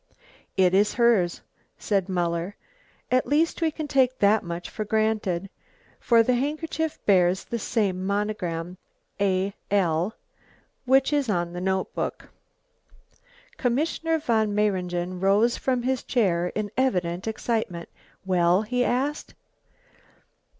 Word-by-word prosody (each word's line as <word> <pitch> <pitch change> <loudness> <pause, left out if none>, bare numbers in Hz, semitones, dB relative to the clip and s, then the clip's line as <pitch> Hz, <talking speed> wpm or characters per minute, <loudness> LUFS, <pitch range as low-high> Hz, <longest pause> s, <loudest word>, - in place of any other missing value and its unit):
"It 185 -1 +4
is 205 +2 +3
hers," 230 -8 +2 0.4
said 195 -2 -1
Muller. 175 +1 -1 0.6
"At 255 0 +2
least 320 +4 +1
we 325 - +3
can 310 0 -5
take 260 -2 +2
that 210 +2 +4
much 170 0 -5
for 215 - -5
granted, 210 -4 0 0.5
for 230 -1 +4
the 250 - +2
handkerchief 310 +4 -2
bears 185 -2 +3
the 235 - -4
same 200 -5 -1
monogram, 185 -4 -2 0.4
A. 195 0 +1 0.2
L., 185 0 +1 0.7
which 265 +3 +3
is 285 -5 +1
on 175 -3 -1
the 180 - -5
notebook." 190 0 -2 1.3
Commissioner 320 +6 0
von 220 -8 0
Mayringen 180 -3 -1
rose 205 +5 +3
from 255 -2 -1
his 260 0 0
chair 180 -8 +1
in 210 -1 -2
evident 185 -8 0
excitement. 220 -6 -2 0.4
"Well?" 180 +1 +3
he 250 +3 0
asked. 275 +5 -2
205 Hz, 120 wpm, -25 LUFS, 180-245 Hz, 1.3 s, It